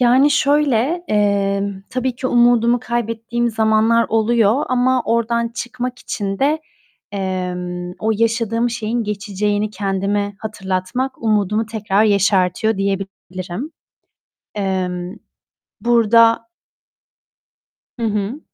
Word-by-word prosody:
Yani, 255 +4 +5
şöyle, 290 +2 +2
emm, 200 -1 0
tabii 255 -1 -1
ki 260 - -3
umudumu 240 0 +4
kaybettiğim 235 0 -2
zamanlar 220 +1 +3
oluyor 225 +3 +2
ama 255 0 +2
oradan 235 0 +1
çıkmak 250 +1 -5
için 195 -4 -4
de, 295 +3 +2 0.5
emm, 180 -2 -3
o 220 - 0
yaşadığım 230 +1 0
şeyin 235 0 -2
geçeceğini 210 0 -1
kendime 200 0 -1
hatırlatmak 215 +5 -3
umudumu 215 0 +1
tekrar 215 -1 +1
yeşertiyor 200 0 +2
diyebilirim. 195 - -4 0.9
Emm 185 -2 -2 0.7
burada 230 -1 +4 1.5
Hı 230 - -1
hı. 210 +6 -2
220 Hz, 95 wpm, -19 LUFS, 200-240 Hz, 1.5 s, Yani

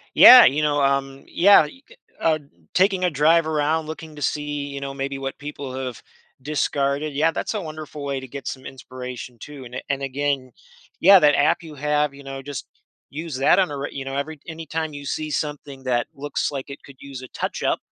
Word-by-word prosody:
Yeah, 250 0 +11
you 145 +4 +3
know, 145 -1 +1
um, 135 0 0
yeah, 200 -3 +6
you 265 - -12
could, - - -19 0.2
uh, 155 -1 +2 0.3
taking 190 0 +3
a 180 - +3
drive 160 +2 +3
around 155 +1 0
looking 155 0 -8
to 145 - -10
see, 145 -1 -2
you 140 0 -6
know, 140 0 -5
maybe 135 0 -4
what 135 0 -5
people 145 -2 -7
have 130 -2 -5 0.4
discarded. 140 +1 -1
Yeah, 155 +3 +2
that's - - -3
a 215 - -2
wonderful 155 -2 -8
way 140 -1 -2
to 130 - -9
get 135 0 -8
some 130 - -6
inspiration 125 -1 -8
too, 140 +2 -10
and 125 +1 -10
a - - -4
and 140 -1 -1
again, 135 -1 -2 0.5
yeah, 195 -1 +9
that 150 -3 +5
app 145 +4 +3
you 155 -2 -10
have, 150 0 0
you 140 - -13
know, 135 0 -7
just 140 -3 -6 0.4
use 155 -1 -6
that 135 +8 +4
on 185 - +2
a 145 - -4
re 140 +1 -4
you 135 -1 -6
know, 135 0 -4
every 145 +2 -4
anytime 160 -1 -4
you 145 0 -8
see 155 +2 -3
something 145 -3 -4
that 120 -2 0
looks 145 +1 -2
like 140 -2 -6
it 140 - -9
could 140 - -14
use 135 -2 -8
a 130 - -9
touch - - -4
up, - - +1
145 Hz, 215 wpm, -23 LUFS, 135-155 Hz, 0.5 s, Yeah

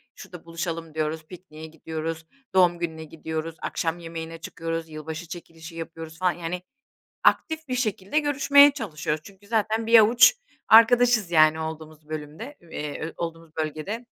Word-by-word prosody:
şurada 175 -2 -12
buluşalım 165 -1 -5
diyoruz, 155 0 -2
pikniğe 160 -2 -12
gidiyoruz, 160 0 -6 0.3
doğum 175 -2 +4
gününe 160 -2 -4
gidiyoruz, 160 +1 -5
akşam 165 +1 -2
yemeğine 165 0 -7
çıkıyoruz, 165 0 -5
yılbaşı 160 +2 -7
çekilişi 165 -1 -10
yapıyoruz 165 -1 -8
falan, 180 -1 +3
yani, 175 +1 -5 0.6
aktif 320 -1 +2
bir 255 - -2
şekilde 215 +1 0
görüşmeye 285 -1 +6
çalışıyoruz. 155 - -3
Çünkü 200 +2 -16
zaten 220 0 0
bir 230 0 +8
avuç 235 - +7 0.3
arkadaşız, 230 -3 +6
yani, 155 -1 +5
olduğumuz 155 -1 -7
bölümde, 155 - -7
eee, 160 -1 -6
olduğumuz 165 -1 -6
bölgede. 160 +10 -4
165 Hz, 135 wpm, -25 LUFS, 160-210 Hz, 0.6 s, bir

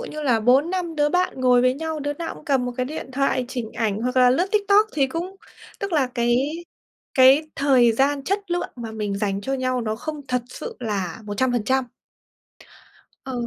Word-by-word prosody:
như 305 -11 -6
là 240 -5 +2
4-5 325 +8 +2
đứa 295 -1 +2
bạn 360 -5 0
ngồi 250 -1 +4
với 255 +1 +3
nhau, 320 +1 -4
đứa 290 0 -2
nào 330 +3 -5
cũng - - -15
cầm 270 -5 +1
một 245 - -3
cái 255 0 -1
điện 285 -2 -6
thoại 265 -1 +1
chỉnh 245 -4 -5
ảnh 220 -2 -1
hoặc 250 +1 -2
là 250 -1 +6
lướt 345 +9 +2
TikTok 415 +1 +4
thì 275 -3 +2
cũng 350 +7 -5 0.4
tức 395 -2 -4
là 285 -5 +3
cái 240 0 +2 0.8
cái 265 +3 +7
thời 255 -4 +4
gian 275 +3 +1
chất 395 -1 -2
lượng 350 0 -1
mà 230 -2 -6
mình 205 -2 -3
dành 200 -1 -1
cho 270 +6 -2
nhau 255 -1 -1
nó 220 -1 -2
không 305 +4 -6
thật 250 -1 0
sự - - -8
là 200 -7 -3
100%. 245 +4 0 1.4
Ờ, 265 - -6
260 Hz, 195 wpm, -23 LUFS, 240-305 Hz, 1.4 s, cái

